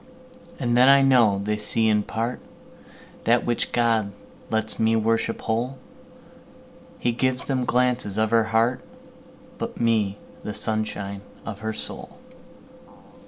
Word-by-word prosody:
And 120 -1 0
then 125 +2 +6
I 140 0 +7
know 120 -7 +4
they 105 +1 -1
see 110 +1 +1
in 105 -1 +3
partThat 115 0 -4
which 120 -1 -1
God 115 -4 +1 0.4
lets 110 0 -1
me 110 0 +3
worship 115 +1 0
whole:He 120 0 -6
gives 130 +2 0
them 130 -2 -1
glances 125 -5 +1
of 110 0 +1
her 115 -1 +4
heart, 115 +3 +1 0.8
But - - -5
me, 110 -4 +1 0.3
the 105 - -5
sunshine 105 -2 -3 0.2
of 105 -3 -6
her 110 +1 -3
soul. - - -6
115 Hz, 120 wpm, -24 LUFS, 110-120 Hz, 0.8 s, I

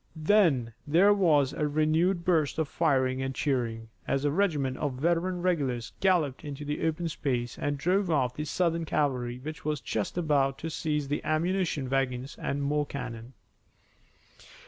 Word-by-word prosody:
Then 155 - +3
there 180 +7 +5
was 150 -8 +3
a 150 - 0
renewed 160 +4 +1
burst 160 -6 +2
of 160 -2 0
firing 130 -5 +1
and 135 0 -3
cheering, 115 -5 -1 0.2
as 135 +1 0
a 145 - +2
regiment 150 -8 0
of 145 -3 -2
veteran 175 +5 0
regulars 135 -10 -1
galloped 170 -9 +1
into 145 0 -6
the 150 +2 -1
open 160 +2 -1
space 125 -7 -2
and 145 0 -1
drove 185 +5 +1
off 130 -6 +1
the 150 +3 -4
Southern 165 +1 0
cavalry 125 -6 -1
which 155 +7 -8
was 150 -1 -1
just 110 - -3
about 140 -5 +1
to 165 - -5
seize 150 -2 -1
the 145 +1 -2
ammunition 165 -3 0
wagons 130 0 -1
and 140 0 -2
more 145 +1 0
cannon. 125 -2 -7
150 Hz, 160 wpm, -28 LUFS, 135-165 Hz, 0.2 s, there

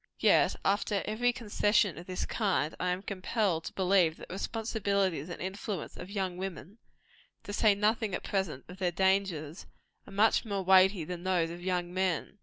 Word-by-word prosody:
Yet, - - +4
after 200 0 +1
every 235 +3 +1
concession 210 -4 +1
of 175 - -11
this 185 -1 -3
kind, 195 -8 0
I 180 - 0
am 180 +2 -2
compelled 190 -3 -1
to - - -6
believe 185 -4 +3
that - - -11
the - - -6
responsibilities 200 -6 -1
and 175 - -6
influence 190 0 -5
of 180 - -9
young 190 -3 -2
women 190 +3 -7 0.6
to 205 - -7
say 210 0 +4
nothing 210 -1 +1
at - - -5
present 190 -9 -2
of 180 - -10
their 180 -2 +1
dangers 190 -4 0 0.4
are - - -11
much 210 +3 +3
more 200 -3 -3
weighty 190 -1 +5
than 175 +2 -6
those 175 -3 +1
of 175 +1 -8
young 180 -1 -2
men. 185 +2 -1
190 Hz, 180 wpm, -30 LUFS, 180-205 Hz, 0.6 s, weighty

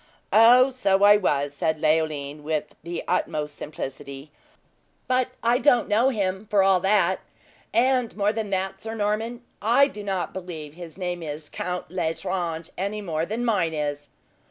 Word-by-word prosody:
"Oh, 245 +4 +7
so 200 -6 +1
I 205 +1 +8
was," 145 -7 0
said 160 0 -1
Leoline, 155 -2 0
with 155 0 -3
the 170 +1 -5
utmost 155 -4 -1
simplicity. 140 0 -7 0.8
"But 255 0 +2 0.2
I 240 +2 +3
don't 245 -5 +4
know 225 +5 +3
him, 200 -3 -2
for 200 -2 +3
all 190 -1 +4
that; 190 -1 +2 0.5
and 250 -2 +2
more 205 +1 +2
than 220 -2 -3
that, 190 0 -2
Sir 225 0 -5
Norman, 225 +3 -2 0.2
I 245 +6 +5
do 210 -7 -8
not 190 -4 -2
believe 165 -5 -7
his 170 0 -10
name 180 -2 -3
is 150 -1 -7
Count 180 -2 -4
L'Estrange, 165 -1 -2
any 200 +3 -2
more 165 -2 -2
than 230 +3 -2
mine 170 -8 +1
is!" 145 -1 -3
185 Hz, 155 wpm, -25 LUFS, 160-215 Hz, 0.8 s, I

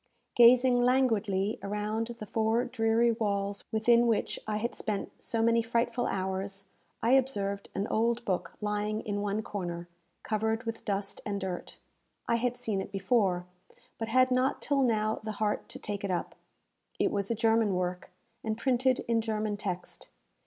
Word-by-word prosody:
Gazing 245 +1 +6
languidly 220 -6 +2
around 210 +2 -2
the 215 - -7
four 225 +3 +1
dreary 230 0 +2
walls 200 -3 -1
within 235 +2 +4
which 225 -2 0
I 210 -1 0
had 235 +3 -2
spent 210 -2 -3
so 225 -1 0
many 230 0 +4
frightful 235 +2 0
hours, 190 +1 -3 0.4
I 230 - +3
observed 205 -7 +1
an 195 - 0
old 235 +2 0
book 185 -2 -2
lying 210 +1 -1
in 205 -1 -3
one 205 +1 -1
corner, 175 -4 -5 0.4
covered 220 +1 0
with 230 -1 -5
dust 200 -1 -2
and 200 -1 -2
dirt. 185 -2 -5 0.5
I 235 - +3
had 245 +1 -1
seen 220 -5 -1
it 190 - -7
before, 195 -2 +1 0.5
but 225 - -2
had 255 +2 +4
not 255 +1 +2
till 285 -1 +1
now 220 -3 +1
the 215 0 -4
heart 210 0 -1
to - - -8
take 205 -1 -5
it 200 - -2
up. 180 - -2 0.6
It - - +2
was 200 -1 -1
a 230 - +1
German 225 -3 +3
work, 180 0 -2 0.3
and 220 -1 -2
printed 255 +1 +1
in 230 -1 +2
German 215 -1 -1
text. 185 -3 -5
220 Hz, 165 wpm, -30 LUFS, 200-235 Hz, 0.6 s, Gazing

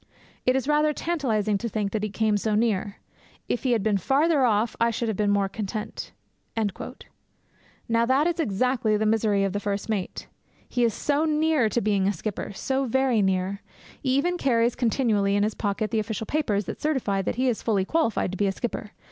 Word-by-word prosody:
It 255 - +4
is 265 0 -1
rather 300 0 +3
tantalizing 225 -12 0
to 235 - -3
think 205 -2 -2
that 215 - -1
he 215 - -2
came 215 +1 +1
so 210 +1 0
near; 210 -2 0 0.5
if 245 - -1
he 255 -2 +1
had 220 -4 +1
been 205 -2 +2
farther 285 - +2
off 220 -1 +2
I 230 - +4
should 230 +1 -2
have 220 - -1
been 205 +1 +1
more 200 -1 +2
content.' 210 +1 -5 1.8
Now 230 0 +2
that 270 +4 +3
is 345 0 0
exactly 230 -3 +1
the 215 - 0
misery 215 -2 +2
of 195 -1 -1
the 205 - -1
first 205 +1 -3
mate. 200 -4 -3 0.4
He 245 - 0
is 230 -2 +2
so 295 +2 +1
near 305 -6 +2
to 240 - 0
being 200 -3 +1
a 200 - +2
skipper, 205 0 -4
so 265 +7 -1
very 255 -2 +2
near. 190 +1 0 0.4
He 260 -1 +1
even 350 +5 0
carries 235 -2 +2
continually 220 -5 +1
in 205 - +2
his 215 +1 0
pocket 210 +1 -2
the 225 - +1
official 220 0 -3
papers 215 -8 0
that - - -6
certify 255 -10 0
that - - -2
he 255 +2 +1
is 240 -4 0
fully 200 -4 +1
qualified 230 - 0
to 190 - -5
be 205 - +3
a - - +1
skipper. 215 0 -5
220 Hz, 205 wpm, -25 LUFS, 205-260 Hz, 1.8 s, It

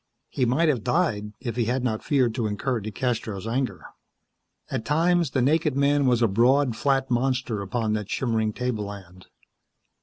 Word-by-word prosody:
He 130 - 0
might 135 +8 +2
have 130 -8 +1
died, 120 -8 0
if 120 -4 -4
he 120 -2 0
had 125 +3 -1
not 110 -4 -1
feared 130 -6 +2
to 115 -2 -1
incur 115 +4 -2
DeCastros' 110 -2 -3
anger. 125 +3 -2 0.9
At 130 -4 -2
times 165 +4 +2
the 130 -2 0
naked 150 +1 +2
man 140 0 +3
was 120 -1 +3
a - - +5
broad, 120 +5 +3
flat 135 +1 0
monster 125 -3 0
upon 110 +2 -1
that 105 -1 -3
shimmering 110 -4 0
tableland. 100 -6 -5
125 Hz, 160 wpm, -25 LUFS, 110-135 Hz, 0.9 s, a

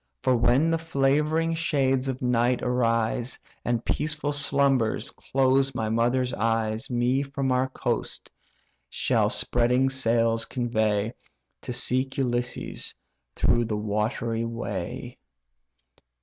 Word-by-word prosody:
For 130 - +3
when 125 +7 +3
the 165 - +1
favouring 155 +2 +1
shades 135 -5 +1
of 130 -1 -3
night 125 0 +2
arise, 120 0 0 0.3
And 120 -1 -1
peaceful 150 -1 -1
slumbers 140 -5 +1
close 135 0 +1
my 110 -3 -1
mother's 120 +3 +1
eyes, 115 0 -1
Me 125 +2 +1
from 140 -1 -2
our 130 +1 +1
coast - - -3 0.6
shall - - +1
spreading 125 +2 +1
sails 115 -3 +2
convey, 110 -3 0 0.5
To - - -5
seek 130 +2 0
Ulysses 125 -2 -2 0.4
through 120 0 +2
the 110 -1 -2
watery 110 +2 -1
way." 115 +1 -5
125 Hz, 110 wpm, -26 LUFS, 115-135 Hz, 0.6 s, For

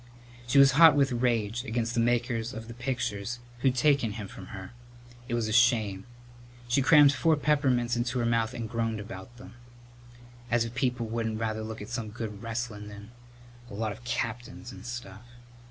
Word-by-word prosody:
She 120 - +2
was 140 0 +8
hot 155 +2 +8
with 140 -2 +3
rage 120 -2 0
against 115 -2 -2
the 120 - 0
makers 120 0 0
of 115 +1 -8
pictures 120 -4 -2 0.2
who'd 130 0 +2
taken 130 -4 +2
him 105 -2 -6
from 95 -1 -11
her. 95 -2 -9 0.6
It 120 - -1
was 115 -2 0
a 110 - -2
shame. 110 -5 +3 0.6
She 120 +3 +2
crammed 145 0 +7
four 160 +3 +3
peppermints 135 -5 +1
into 120 +1 -1
her 120 - 0
mouth 115 +1 +1
and 115 -2 -4
groaned 115 -1 -2
about 105 +2 -9
them, 125 - -12 1.0
"As 115 0 +2
if 115 - -7
people 125 -3 -1
wouldn't 110 -1 -2
rather 110 -1 -2
look 110 -1 -6
at 105 - -10
some 115 -3 -4
good 105 -2 -6
wrestlin' 115 -2 -4
than 105 +2 -11 0.6
a - - -8
lot 110 0 -2
of 110 +4 -10
captains 120 +1 -4
and 120 - -10
stuff!" 110 -4 -7
120 Hz, 180 wpm, -28 LUFS, 110-125 Hz, 1.0 s, was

